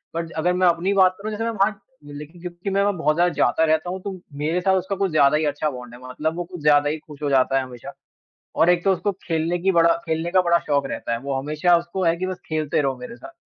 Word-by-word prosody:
But 165 Hz, 0 st, -3 dB
अगर 180 Hz, +3 st, +1 dB
मैं 180 Hz, 0 st, +3 dB
अपनी 175 Hz, +3 st, +1 dB
बात 185 Hz, -1 st, +4 dB
करूँ, 215 Hz, +2 st, -5 dB
जैसे 220 Hz, +2 st, -3 dB
मैं 230 Hz, -, -1 dB
वहाँ 200 Hz, 0 st, 0 dB, 0.2 s
लेकिन 150 Hz, +4 st, -10 dB
क्योंकि 180 Hz, +2 st, -6 dB
मैं 195 Hz, +1 st, +1 dB
वहाँ 205 Hz, 0 st, +2 dB
बहुत 155 Hz, -2 st, +1 dB
ज़्यादा 175 Hz, +1 st, +2 dB
जाता 160 Hz, -, +2 dB
रहता 160 Hz, +2 st, +1 dB
हूँ, 190 Hz, +1 st, -4 dB
तो 190 Hz, -1 st, -6 dB, 0.2 s
मेरे 160 Hz, +5 st, -1 dB
साथ 190 Hz, 0 st, +3 dB
उसका 190 Hz, +2 st, -2 dB
कुछ 195 Hz, -2 st, -1 dB
ज़्यादा 150 Hz, -1 st, +4 dB
ही 155 Hz, -, 0 dB
अच्छा 145 Hz, +1 st, -1 dB
बॉन्ड 125 Hz, -3 st, -9 dB
है, 120 Hz, -, -11 dB
मतलब 155 Hz, +5 st, -2 dB
वो 175 Hz, -, -2 dB
कुछ 175 Hz, -2 st, -10 dB
ज़्यादा 145 Hz, -1 st, +4 dB
ही 155 Hz, -, -2 dB
खुश 150 Hz, -1 st, -14 dB
हो 145 Hz, -, 0 dB
जाता 135 Hz, 0 st, +3 dB
है 135 Hz, -, +1 dB
हमेशा 130 Hz, +2 st, -10 dB, 0.7 s
और 165 Hz, -, +5 dB
एक 175 Hz, -1 st, +3 dB
तो 195 Hz, -, +3 dB
उसको 200 Hz, +3 st, -1 dB
खेलने 165 Hz, +1 st, -1 dB
की, 190 Hz, +2 st, +2 dB
बड़ा 170 Hz, -1 st, +4 dB
खेलने 160 Hz, +1 st, -2 dB
का 185 Hz, -, +4 dB
बड़ा 170 Hz, -1 st, +3 dB
शौक 140 Hz, -2 st, 0 dB
रहता -, -, -5 dB
है। 115 Hz, -, -1 dB
वो 140 Hz, 0 st, -3 dB
हमेशा 155 Hz, +5 st, +2 dB
उसको 175 Hz, +2 st, -4 dB
है 165 Hz, 0 st, +3 dB
कि 185 Hz, -, -2 dB
बस 185 Hz, -1 st, -5 dB
खेलते 155 Hz, -1 st, -1 dB
रहो 135 Hz, -2 st, -1 dB
मेरे 240 Hz, -2 st, -9 dB
साथ, 335 Hz, +5 st, -12 dB
170 Hz, 270 wpm, -22 LUFS, 150-185 Hz, 0.7 s, और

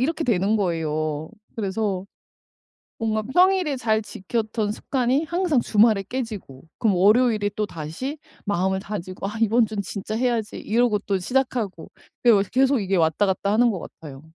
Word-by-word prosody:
이렇게 320 Hz, +5 st, 0 dB
되는 205 Hz, -3 st, +2 dB
거예요. 155 Hz, -4 st, -2 dB, 0.3 s
그래서 200 Hz, -2 st, -2 dB, 1.0 s
뭔가 220 Hz, -1 st, 0 dB
평일에 360 Hz, -, +3 dB
잘 220 Hz, -3 st, +1 dB
지켰던 215 Hz, +1 st, -2 dB
습관이 255 Hz, +5 st, 0 dB
항상 340 Hz, -5 st, +1 dB
주말에 215 Hz, -3 st, +3 dB
깨지고 215 Hz, -, -6 dB, 0.2 s
그럼 215 Hz, -5 st, +2 dB
월요일에 210 Hz, +2 st, +4 dB
또다시 210 Hz, -, -4 dB, 0.3 s
마음을 190 Hz, -1 st, 0 dB
다지고 190 Hz, -1 st, -5 dB
'아 210 Hz, +2 st, -6 dB
이번 225 Hz, +1 st, +4 dB
주는 210 Hz, -1 st, -3 dB
진짜 205 Hz, +2 st, -5 dB
해야지.' 235 Hz, -3 st, -1 dB
이러고 230 Hz, -1 st, +1 dB
또 200 Hz, -1 st, -1 dB
시작하고 235 Hz, -4 st, -2 dB, 0.3 s
그게 245 Hz, -, +4 dB
요새 200 Hz, -2 st, +3 dB
계속 265 Hz, 0 st, +3 dB
이게 195 Hz, -1 st, 0 dB
왔다 165 Hz, +3 st, +2 dB
갔다 200 Hz, +1 st, 0 dB
하는 235 Hz, +2 st, +4 dB
것 190 Hz, -, -4 dB
같아요. 140 Hz, -4 st, -10 dB
215 Hz, 345 characters per minute, -23 LUFS, 190-245 Hz, 1.0 s, 월요일에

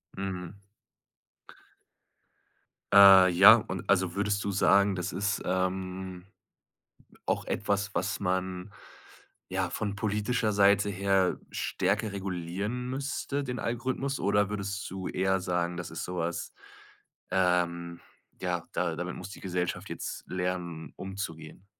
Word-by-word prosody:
Mhm. 95 Hz, -1 st, -5 dB, 2.4 s
Äh, 95 Hz, -2 st, +9 dB
ja, 95 Hz, +6 st, +9 dB
und 95 Hz, -5 st, -4 dB
also 95 Hz, -2 st, +2 dB
würdest 100 Hz, 0 st, 0 dB
du 100 Hz, -, 0 dB
sagen, 100 Hz, +1 st, +4 dB
das 90 Hz, 0 st, -3 dB
ist, 100 Hz, +1 st, -1 dB
ähm, 95 Hz, 0 st, -2 dB, 1.0 s
auch -, -, -1 dB
etwas, 100 Hz, 0 st, -1 dB
was 95 Hz, +2 st, -1 dB
man 95 Hz, 0 st, -2 dB, 0.8 s
ja 95 Hz, -1 st, -1 dB
von 100 Hz, +2 st, -3 dB
politischer 105 Hz, +2 st, 0 dB
Seite 100 Hz, 0 st, +4 dB
her 95 Hz, -1 st, +1 dB
stärker 100 Hz, +3 st, -1 dB
regulieren 100 Hz, +6 st, -3 dB
müsste, 140 Hz, +1 st, -3 dB
den 125 Hz, -3 st, -4 dB
Algorithmus? 130 Hz, +3 st, -2 dB
Oder 100 Hz, +1 st, +2 dB
würdest 100 Hz, -1 st, -4 dB
du 95 Hz, 0 st, -5 dB
eher 95 Hz, +1 st, +1 dB
sagen, 90 Hz, -1 st, -1 dB
das 85 Hz, -, -5 dB
ist 80 Hz, -, -5 dB
so 90 Hz, 0 st, -5 dB
was 85 Hz, 0 st, -3 dB, 0.8 s
ähm, 85 Hz, -2 st, +1 dB, 0.4 s
ja, -, -, -1 dB
da -, -, -1 dB
damit -, -, -4 dB
muss -, -, -8 dB
die -, -, -10 dB
Gesellschaft 90 Hz, -2 st, -3 dB
jetzt -, -, -5 dB
lernen 90 Hz, -3 st, -4 dB
umzugehen? 95 Hz, -2 st, -7 dB
95 Hz, 120 wpm, -29 LUFS, 90-100 Hz, 2.4 s, Äh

